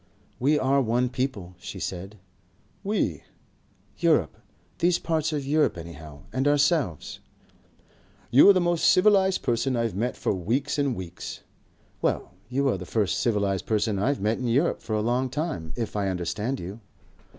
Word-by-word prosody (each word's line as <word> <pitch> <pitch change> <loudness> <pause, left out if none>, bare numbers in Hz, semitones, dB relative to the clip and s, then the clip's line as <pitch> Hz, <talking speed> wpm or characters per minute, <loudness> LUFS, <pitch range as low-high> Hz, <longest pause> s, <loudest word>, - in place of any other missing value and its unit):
"We 145 +4 +3
are 135 0 +2
one 120 +1 +1
people," 125 -9 -3
she - - -8
said. 95 +3 -5 0.7
"We?" 195 - -1 0.8
"Europe. - - +2 0.4
These 175 0 +3
parts 160 -1 -1
of 145 -3 -2
Europe 150 -7 +2
anyhow. 80 -3 -10
And 130 +2 +1
ourselves." 145 - +1 1.1
"You 135 +10 +8
are - - +9
the 185 - +3
most 175 -2 +1
civilized 190 -1 +4
person 125 +2 0
I've 115 -2 0
met 115 +6 -2
for - - 0
weeks 125 - -1
and 140 -4 +1
weeks." 90 -3 -7 0.6
"Well, - - -1 0.2
you 135 +2 +1
are 95 - -1
the 90 - -7
first 105 -4 0
civilized 100 -5 0
person 105 -2 +1
I've 135 +8 +1
met 110 +3 0
in 125 - -2
Europe 135 +9 +1
for 110 - -5
a 105 - +1
long 125 +4 0
time. 145 - -3
If 115 -3 -4
I 100 -1 0
understand 95 +8 -2
you." 95 +6 -7
120 Hz, 160 wpm, -26 LUFS, 100-145 Hz, 1.1 s, are